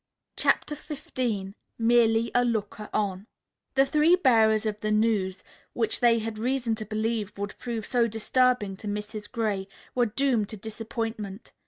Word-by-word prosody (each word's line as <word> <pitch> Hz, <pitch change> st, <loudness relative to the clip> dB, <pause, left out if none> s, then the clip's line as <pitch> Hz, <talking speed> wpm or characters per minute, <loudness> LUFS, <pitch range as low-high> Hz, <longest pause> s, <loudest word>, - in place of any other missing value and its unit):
CHAPTER 300 Hz, -, +2 dB
XV 245 Hz, -9 st, -4 dB, 0.2 s
MERELY 230 Hz, 0 st, +3 dB
A 245 Hz, -, +4 dB
LOOKER 215 Hz, -3 st, -2 dB
ON 200 Hz, -1 st, -1 dB, 0.5 s
The 270 Hz, 0 st, +5 dB
three 305 Hz, +5 st, +4 dB
bearers 225 Hz, -, +4 dB
of 210 Hz, -1 st, -2 dB
the 215 Hz, -, -2 dB
news, 215 Hz, -4 st, +1 dB, 0.3 s
which 225 Hz, -2 st, 0 dB
they 235 Hz, -1 st, +5 dB
had 220 Hz, -1 st, -4 dB
reason 245 Hz, 0 st, 0 dB
to 220 Hz, 0 st, -4 dB
believe 215 Hz, 0 st, -1 dB
would 200 Hz, 0 st, -4 dB
prove 230 Hz, -3 st, -4 dB
so 240 Hz, -2 st, +2 dB
disturbing 225 Hz, -1 st, +1 dB
to 210 Hz, -, -8 dB
Mrs. 210 Hz, +1 st, -5 dB
Gray, 210 Hz, -5 st, -1 dB, 0.3 s
were 245 Hz, -1 st, +2 dB
doomed 235 Hz, -2 st, +1 dB
to 215 Hz, -, -7 dB
disappointment. 220 Hz, -1 st, -5 dB
225 Hz, 150 wpm, -27 LUFS, 210-240 Hz, 0.5 s, The